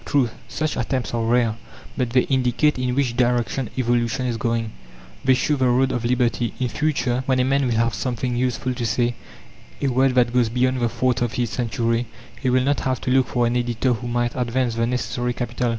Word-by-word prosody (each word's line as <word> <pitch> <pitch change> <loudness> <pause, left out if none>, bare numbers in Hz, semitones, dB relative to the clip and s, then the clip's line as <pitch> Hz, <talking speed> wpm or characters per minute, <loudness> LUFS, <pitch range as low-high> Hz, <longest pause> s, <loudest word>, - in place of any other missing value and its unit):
True, 130 -5 +1 0.2
such 155 -1 -2
attempts 125 +1 -2
are 115 - 0
rare, 115 -1 +2 0.4
but 125 -2 -1
they 125 +2 +4
indicate 130 +2 +1
in 125 -1 -1
which 130 -4 0
direction 125 0 0
evolution 120 +1 0
is 120 -2 -1
going. 115 -1 -1 0.5
They 130 -1 +4
show 145 +3 +1
the 130 -1 +2
road 130 +2 +3
of 125 -2 -2
liberty. 120 -2 0
In 125 -1 0
future, 125 0 0
when 130 -1 +2
a - - +4
man 135 +1 +2
will 120 - 0
have 115 0 +1
something 125 0 -2
useful 125 +1 -1
to 120 -1 -3
say 120 +3 +1 0.7
a 140 - 0
word 130 +1 +2
that 120 -1 +3
goes 125 -2 +3
beyond 125 +2 +1
the 120 -1 +1
thoughts 120 +1 0
of 120 -2 0
his 120 -2 -1
century, 115 0 -1 0.3
he 130 - +1
will 130 0 +3
not 140 +1 +1
have 130 -2 -1
to 125 - -1
look 130 -1 +3
for 120 -2 +1
an 120 +1 0
editor 120 +1 +1
who 120 +1 -5
might 120 0 -1
advance 125 -1 0
the 115 0 0
necessary 125 0 -2
capital. 125 0 -2
125 Hz, 215 wpm, -22 LUFS, 120-130 Hz, 0.7 s, they